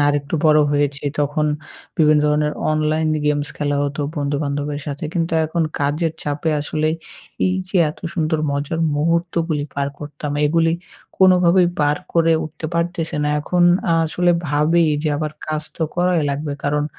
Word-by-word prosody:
আরেকটু 145 +1 0
বড়ো 155 -1 +6
হয়েছি 145 0 0 0.2
তখন 150 +1 0 0.5
বিভিন্ন 155 -1 +5
ধরনের 150 0 +1 0.2
online 155 +1 +1 0.2
games 145 0 +1
খেলা 145 -1 0
হতো 145 +1 -2 0.2
বন্ধুবান্ধবের 145 0 -2
সাথে 145 +1 -4
কিন্তু 165 -1 -1
এখন 165 +1 -1 0.2
কাজের 150 +3 0
চাপে 145 +2 -1
আসলে 155 +1 -1 0.6
এই 185 - +1
যে 195 - -1
এত - - -13 0.2
সুন্দর 160 -2 0
মজার 145 +3 -2 0.2
মুহূর্তগুলি 165 -1 0
পার 140 0 -1
করতাম 150 0 -6
এগুলি 165 +1 +2 0.5
কোনোভাবেই 180 -1 +5
পার 145 0 +2 0.2
করে 165 -1 +4
উঠতে 155 +1 -6
পারতেছিনা। 165 -3 -1
এখন 175 +3 +1 0.4
আসলে 175 +2 +1 0.2
ভাবি 155 +4 +3 0.2
যে 155 - 0
আবার 155 0 -3
কাজ 155 0 -2
তো - - -2
করাই 175 -2 +2
লাগবে 145 +1 -3
কারণ 145 +1 +1
155 Hz, 145 wpm, -20 LUFS, 145-165 Hz, 0.6 s, বড়ো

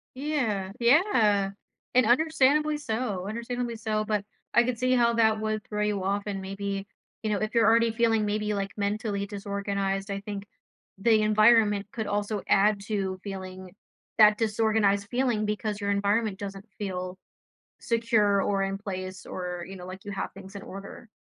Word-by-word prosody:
Yeah. 250 -9 -1
Yeah, 235 - +4 0.4
and 255 0 +5
understandably 300 +3 +3
so, 220 -8 -3
understandably 235 +2 -3
so, 215 -1 -1
but 210 -2 -1 0.3
I 240 - +6
could 240 -1 -2
see 255 +1 +2
how 235 -2 +4
that 220 -2 +3
would 215 -1 -2
throw 210 0 -2
you 205 -2 -1
off 200 +1 0
and 200 -2 -3
maybe, 195 +1 -4 0.3
you 220 - -2
know, 205 - +1
if 215 +1 -2
you're 230 -1 +4
already 230 +1 +4
feeling 225 -1 +2
maybe, 210 0 -1
like, 195 0 -2
mentally 205 0 -1
disorganized, 200 -1 -3
I 200 0 -3
think 205 0 -6 0.5
the 215 +2 +4
environment 215 -1 +4
could 220 -2 -4
also 205 0 -1
add 200 +1 +3
to 195 -3 -2
feeling 185 -1 -7 0.4
that 210 -1 +7
disorganized 215 -2 +2
feeling, 245 -4 +1
because 210 0 -2
your 200 -1 -1
environment 200 0 +1
doesn't 195 0 -6
feel 185 -2 -4 0.6
secure, 225 -4 +2
or 195 0 +1
in 195 0 -2
place 185 -2 -6
or, 180 -1 -5
you 195 - -8
know, 180 - -9
like 185 +1 -9
you 205 - -5
have 195 - -4
things 195 +1 -12
in 200 - -7
order. 195 +4 -9
210 Hz, 165 wpm, -27 LUFS, 195-225 Hz, 0.6 s, that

